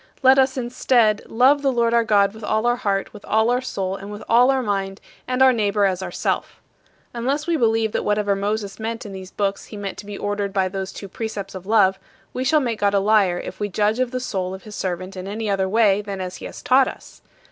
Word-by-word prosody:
" - - -33
Let 265 +1 +7
us, 265 0 +2
instead, 240 -3 +2
"love 265 +5 +4
the 275 -1 +2
Lord 235 -2 +1
our 235 0 +4
God 200 -2 +3
with 220 0 -12
all 220 +2 0
our 240 0 +2
heart, 195 -3 -2
with 210 - -12
all 220 +2 +2
our 250 +1 +1
soul, 195 -7 -3
and 200 +1 -8
with 205 - -8
all 245 +3 +5
our 265 -1 +2
mind, 195 -2 -2 0.3
and 255 +1 +2
our 260 -1 +6
neighbor 205 -2 +1
as 190 -1 0
ourself." - - -3 0.5
Unless 270 +5 -1
we 340 0 +1
believe 225 -5 +2
that - - -1
whatever 205 -1 +1
Moses 200 0 -3
meant 225 +2 -4
in 205 - -7
these 190 -1 -8
books 200 0 -2
he 210 - -10
meant 200 -1 -5
to 205 - -10
be 205 -1 -6
ordered 205 -1 -2
by 190 -1 +1
these 190 0 -4
two 200 - -8
precepts 200 -1 -5
of 190 0 -9
love, 195 -3 +3 0.3
we 255 - -2
shall 305 +4 +3
make 235 -4 -2
God 205 0 +2
a - - +4
liar, 195 -3 +3
if - - -8
we 205 -1 -2
judge 210 +4 +1
of 255 -1 +1
the 255 +1 -3
soul 190 -6 -3
of 190 - -12
his 215 -2 -10
servant 185 +1 -4
in 185 0 -6
any 215 +2 -4
other 190 -1 0
way 210 -1 +3
than 200 -2 -6
as 185 -1 -5
he - - -9
has - - -9
taught 260 +1 +4
us. - - -10
210 Hz, 250 wpm, -22 LUFS, 195-235 Hz, 0.5 s, Let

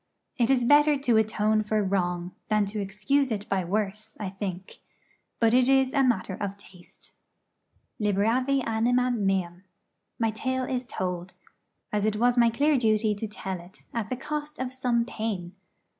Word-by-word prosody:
It 235 -1 +2
is 260 -2 +3
better 290 +3 +5
to 245 -5 +2
atone 215 0 +2
for 215 0 0
wrong 180 -2 -1 0.2
than 215 -1 +2
to 210 - -2
excuse 210 +8 0
it 205 -1 -3
by 190 -2 +1
worse, 210 +3 -3
I 205 -3 -3
think; 190 -2 -6 0.6
but 230 -1 +3
it 255 +1 +4
is 265 -1 +3
a 280 - +3
matter 205 -7 +1
of 200 +1 -4
taste. 185 -3 -16 0.9
'Liberavi 230 +6 +1
animam 245 +2 +1
meam.' 190 -3 -1 0.5
My 225 -1 +1
tale 260 +4 -2
is 250 -1 -3
told, 180 0 -4 0.6
as 210 -1 +1
it 215 - 0
was 240 +3 +3
my 235 -1 +5
clear 285 +4 +2
duty 215 -2 +2
to 210 +2 -4
tell 190 -3 -5
it, 175 +2 -16
at 225 -3 -3
the 255 - -2
cost 300 +2 -5
of 260 0 -4
some 245 -2 +1
pain. 215 -7 -4
220 Hz, 165 wpm, -27 LUFS, 195-250 Hz, 0.9 s, better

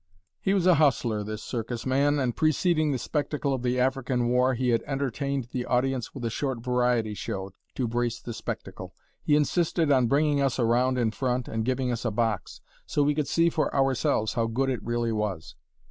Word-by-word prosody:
He 195 - +1
was 185 -3 +1
a 185 - +7
hustler, 120 -7 +2
this 110 +1 -6
circus 115 -1 -4
man, 140 +3 +2
and 130 -4 0
preceding 155 0 +2
the 135 - 0
spectacle 145 +1 -2
of 130 - -2
the 125 0 0
African 130 -2 0
war, 125 +1 +3
he 125 +1 0
had 115 -1 +2
entertained 135 -1 -2
the 125 - -2
audience 125 -1 0
with 125 -3 -5
a - - 0
short 130 0 -2
variety 125 -2 +1
show, 95 -1 -5 0.2
to 125 - -1
brace 120 0 -1
the 120 - -7
spectacle. - - -7 0.3
He 145 - +2
insisted 160 +1 +1
on 130 -3 +4
bringing 145 +2 +2
us 135 -4 +1
around 125 +2 +2
in 115 -3 +1
front 125 +1 -1
and 110 0 -2
giving 130 +1 0
us 120 -1 -3
a 120 - +1
box, 110 -2 -2 0.3
so 145 - +1
we 145 +1 +2
could 150 -1 -1
see 170 0 +2
for 155 - 0
ourselves 130 -5 +1
how 115 -1 0
good 135 +4 0
it 125 - -3
really 120 0 -1
was. 105 -6 -3
125 Hz, 200 wpm, -27 LUFS, 115-140 Hz, 0.3 s, a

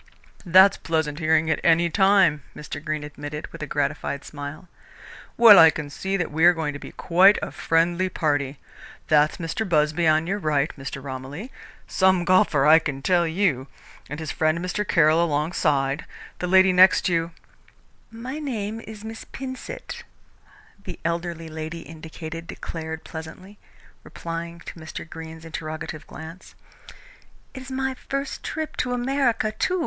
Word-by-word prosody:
"That's 190 +3 +7
pleasant 160 -2 -2
hearing 160 0 +2
at - - 0
any 170 +1 +4
time," 190 -4 +3
Mr. 145 0 -7
Greene 155 -1 -3
admitted, 150 +1 -7
with - - -10
a 155 - -4
gratified 140 0 -2
smile. 145 +4 -8 0.7
"Well, 225 -4 +9
I 160 - +9
can 150 -2 -5
see 190 +6 -2
that 180 -4 -2
we 160 +2 -1
are 175 - +8
going 155 -2 -2
to 145 - -7
be - - -10
quite 190 +4 +4
a - - -4
friendly 170 +3 +1
party. 145 -5 -1 0.5
That's 150 0 +3
Mr. 165 +6 -3
Busby 155 +1 +2
on 155 +1 +3
your 195 +4 -2
right, 150 -4 0
Mr. 135 -1 -7
Romilly 140 - -7 0.3
some 185 -2 +2
golfer, 185 -7 +3
I 155 +2 +8
can 140 -4 -5
tell 175 -1 +3
you! 160 -7 0 0.4
and 150 +2 -6
his 160 -2 -4
friend 155 +1 +1
Mr. 180 +4 -3
Caroll 160 0 +4
alongside. 145 -3 0 0.3
The 180 - -2
lady 190 +1 +5
next 185 +1 +6
you 165 -2 0 0.5
" - - -36 0.2
"My 290 +4 -4
name 225 -7 -4
is 215 -2 -10
Miss 225 0 -8
Pinsent," 265 - -7 0.8
the - - -7
elderly 170 -1 -3
lady 160 +1 -6
indicated 160 +1 -9
declared 160 -1 -6
pleasantly, 185 +5 -10 0.4
replying 170 0 -7
to 170 - -10
Mr. 160 0 -8
Greene's 160 0 -10
interrogative 155 -1 -6
glance. 160 +3 -11 1.0
"It 260 - -8
is 260 - -10
my 265 0 -1
first 275 +1 -5
trip 315 -1 -4
to 250 -1 -1
America, 245 -3 0
too. 365 +11 -1
165 Hz, 155 wpm, -24 LUFS, 155-190 Hz, 1.0 s, Well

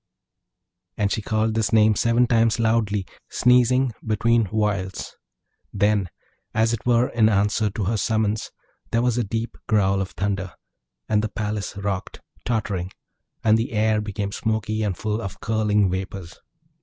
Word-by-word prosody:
And 100 -1 +1
she 110 - -1
called 110 +1 0
this 110 -1 0
name 110 -1 +5
seven 115 +3 +3
times 115 -1 +2
loudly, 110 -3 +1 0.2
sneezing 125 0 +3
between 115 +1 +2
whiles. 100 -2 -2 0.6
Then, 100 -2 +1 0.5
as 115 +1 +2
it 115 0 -4
were 120 +1 +3
in 110 -2 +3
answer 105 +1 +2
to 105 +1 -4
her 110 +4 0
summons, 110 +1 0 0.4
there 115 +1 +1
was 125 -1 +1
a - - +1
deep 115 +3 -3
growl 100 -2 +2
of 95 - -3
thunder, 95 -3 -3 0.5
and 105 -1 +2
the 110 - -2
palace 105 -2 -4
rocked, 100 -2 -4 0.3
tottering; 100 -6 -2 0.5
and 110 0 +4
the 115 - -3
air 110 0 +2
became 100 -1 -4
smoky 110 0 -1
and 100 -5 -1
full 110 +1 -2
of 95 -2 -6
curling 105 -3 +1
vapours. 95 -1 -5
110 Hz, 150 wpm, -23 LUFS, 100-115 Hz, 0.6 s, name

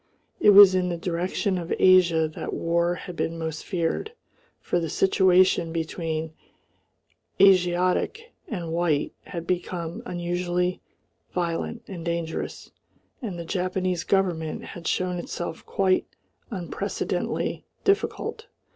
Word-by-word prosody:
It 265 - +5
was 200 -2 +10
in 180 -1 +1
the 175 - -2
direction 180 +3 -1
of 170 -1 -6
Asia 175 -4 +5
that 155 - -5
war 170 +1 +1
had 180 0 -8
been 165 0 -2
most 160 -1 -4
feared, 180 - -2 0.5
for 175 - 0
the 165 -2 -3
situation 185 -2 +3
between 160 -1 -3 1.1
Asiatic 185 - +3
and 175 -7 -4
white 165 -3 0
had 170 -1 -6
become 175 -1 -3
unusually 175 0 -1 0.5
violent 175 +6 -2
and 175 -4 -7
dangerous, 170 -1 -4 0.5
and 205 -8 -4
the 170 - -6
Japanese 185 0 -1
government 175 -5 0
had 170 -1 -8
shown 180 -1 0
itself 175 -1 -5
quite 190 -1 +1 0.4
unprecedentedly 185 -6 -3 0.2
difficult. 400 +3 0
175 Hz, 115 wpm, -25 LUFS, 165-185 Hz, 1.1 s, was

